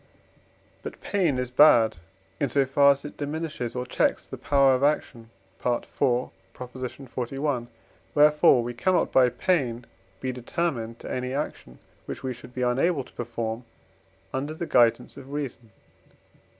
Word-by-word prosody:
But - - -8
pain 175 -10 0
is 125 -1 -3
bad, 120 - +6 0.4
in 140 - 0
so 140 +2 +2
far 140 +2 +5
as 140 +1 -10
it 145 - -8
diminishes 145 -5 -4
or 125 0 -2
checks - - 0
the - - -8
power 140 -2 +3
of 130 - 0
action 135 -5 0 0.3
(IV. 120 -1 -1 0.7
xli.); 130 +1 -4 0.5
wherefore 150 -4 +5
we 120 +1 -4
cannot 180 +10 +1
by 130 -1 +5
pain 125 -3 0 0.3
be 130 - -2
determined 125 -2 -3
to - - -7
any 125 +1 -3
action, 100 - -5 0.3
which - - -6
we 130 -1 -2
should 125 +1 -14
be 125 - -1
unable 135 +5 +1
to - - -19
perform 115 0 -4 0.7
under 145 +4 -3
the 170 - -4
guidance 120 -3 +2
of 135 0 -11
reason. 135 -5 -5
130 Hz, 145 wpm, -26 LUFS, 120-145 Hz, 0.7 s, bad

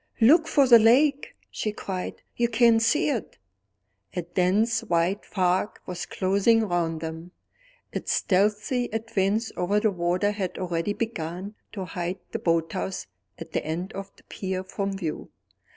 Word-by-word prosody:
"Look 315 +8 +6
for 290 -4 +4
the 235 -2 +9
lake!" 275 +6 +3 0.2
she 215 - -2
cried. 190 -3 -5
"You 235 - +2
can't 230 -1 +4
see 295 +9 +2
it." 250 -7 -3 0.8
A 180 - -1
dense 195 +7 +1
white 175 0 +1
fog 185 +2 0
was 180 -1 -5
closing 200 +4 +2
round 165 -3 -1
them. 165 +2 -7 0.6
Its - - -3
stealthy 210 +6 +1
advance 220 -1 0
over 200 +4 +1
the 215 0 +2
water 180 +2 0
had 195 -3 -4
already 175 +2 -1
begun 190 -3 -4 0.2
to 195 -3 -4
hide 180 0 -4
the - - -3
boathouse 170 - -1 0.3
at - - -9
the - - -1
end 170 +4 -4
of 195 0 -7
the - - -22
pier 190 -1 -4
from 195 +1 -3
view. 165 -5 -4
195 Hz, 150 wpm, -26 LUFS, 180-225 Hz, 0.8 s, the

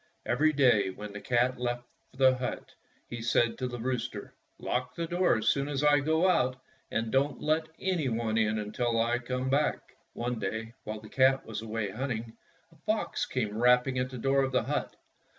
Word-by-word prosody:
Every 150 +6 +3
day, 125 -9 +4
when 105 +2 -8
the 105 - -7
cat 125 +1 +1
left 120 0 -2 0.3
the 130 0 +4
hut, 125 -1 -5 0.3
he 120 -1 -6
said 115 0 +2
to 130 - -1
the 120 -1 -5
rooster, 120 -3 -3 0.2
"Lock 125 0 -2
the 170 - -2
door 175 -2 +2
as 110 - +1
soon 140 0 +1
as 145 -1 -2
I 145 -1 +5
go 160 +5 +2
out 130 -8 +2 0.3
and 115 0 -2
don't 140 0 +1
let 155 +1 +1
any 175 -8 0
one 115 -1 -1
in 110 -1 +2
until 115 +2 -1
I 120 +2 +2
come 125 +1 -3
back." 145 +3 0 0.2
One 120 0 -3
day, 110 +3 -4
while 110 0 -5
the 110 - -11
cat 135 +3 +3
was 110 -1 -5
away 110 -2 -3
hunting, 115 -1 -4 0.4
a - - -21
fox - - -1
came 110 -5 -2
rapping 125 +2 +3
at 125 0 -1
the 130 - -7
door 135 +3 +2
of 135 -1 0
the 125 -3 +2
hut. 145 +5 -2
125 Hz, 195 wpm, -29 LUFS, 115-135 Hz, 0.4 s, I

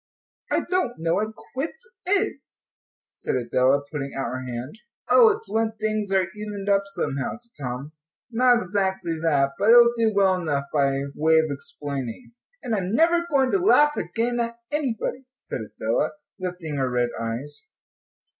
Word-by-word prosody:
"I - - +3
don't 365 -10 +1
know 165 +1 0
what 215 +4 -1 0.2
quits 325 - -4 0.2
is," 410 +2 -1 0.5
said - - -3
Adela, 130 +3 +2
putting 140 -3 -4
out 135 -3 -2
her 130 0 -4
hand. 125 - -6 0.3
"Oh, 465 -2 +8
it's 435 +1 -2
when 225 0 0
things 215 -2 -2
are 190 -1 +3
evened 205 -1 -5
up 200 0 +4
somehow," 140 -8 -3
said 235 - -13
Tom; 125 +4 -4 0.4
"not 245 +1 +5
exactly 190 -5 -1
that, 140 -4 +2
but 210 - +3
it - - +9
will 235 0 +7
do 225 -1 +2
well 190 -3 +3
enough 145 -4 -1
by 140 -2 +2
way 160 +2 +3
of 160 -1 +2
explaining." 140 - -6 0.3
"And 235 - -2
I'm 195 0 0
never 340 +3 +3
going 270 -4 +3
to 395 - +3
laugh 295 -6 +5
again 240 +1 -1
at 235 0 -2
anybody," 265 -2 -2
said - - -6
Adela, - - -1 0.3
lifting 180 -5 -4
her 130 -1 0
red 120 -1 +1
eyes. 120 - -5
195 Hz, 165 wpm, -24 LUFS, 140-240 Hz, 0.5 s, it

